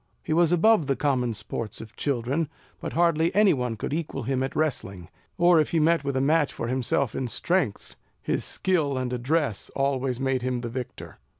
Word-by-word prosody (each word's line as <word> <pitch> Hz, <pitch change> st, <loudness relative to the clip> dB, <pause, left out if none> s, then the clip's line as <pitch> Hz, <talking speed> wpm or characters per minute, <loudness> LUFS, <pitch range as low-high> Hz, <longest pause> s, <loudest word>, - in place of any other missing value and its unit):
He -, -, -1 dB
was 170 Hz, 0 st, +4 dB
above 175 Hz, -2 st, +4 dB
the 135 Hz, -, +1 dB
common 125 Hz, -4 st, 0 dB
sports 105 Hz, +1 st, -5 dB
of 110 Hz, 0 st, -11 dB
children; 140 Hz, +3 st, -1 dB, 0.3 s
but -, -, -5 dB
hardly 170 Hz, -1 st, +3 dB
any 205 Hz, -1 st, +5 dB
one 125 Hz, -4 st, -2 dB
could 110 Hz, -, -4 dB
equal 155 Hz, -4 st, -3 dB
him 130 Hz, +2 st, -1 dB
at 135 Hz, -, -3 dB
wrestling; 100 Hz, -, -2 dB, 0.3 s
or, 175 Hz, -2 st, +5 dB
if 150 Hz, -, -1 dB
he 165 Hz, -, +1 dB
met 165 Hz, 0 st, +3 dB
with 140 Hz, -1 st, -1 dB
a -, -, +2 dB
match 150 Hz, +1 st, +2 dB
for -, -, -4 dB
himself 125 Hz, 0 st, 0 dB
in 130 Hz, -, -2 dB
strength, 145 Hz, -, -1 dB, 0.2 s
his -, -, -2 dB
skill 155 Hz, -8 st, 0 dB
and 125 Hz, -1 st, -2 dB
address 130 Hz, -2 st, -1 dB
always 135 Hz, -2 st, 0 dB
made 135 Hz, -1 st, 0 dB
him 125 Hz, -1 st, -2 dB
the 120 Hz, -, -4 dB
victor. 125 Hz, +1 st, -7 dB
135 Hz, 195 wpm, -26 LUFS, 125-160 Hz, 0.3 s, any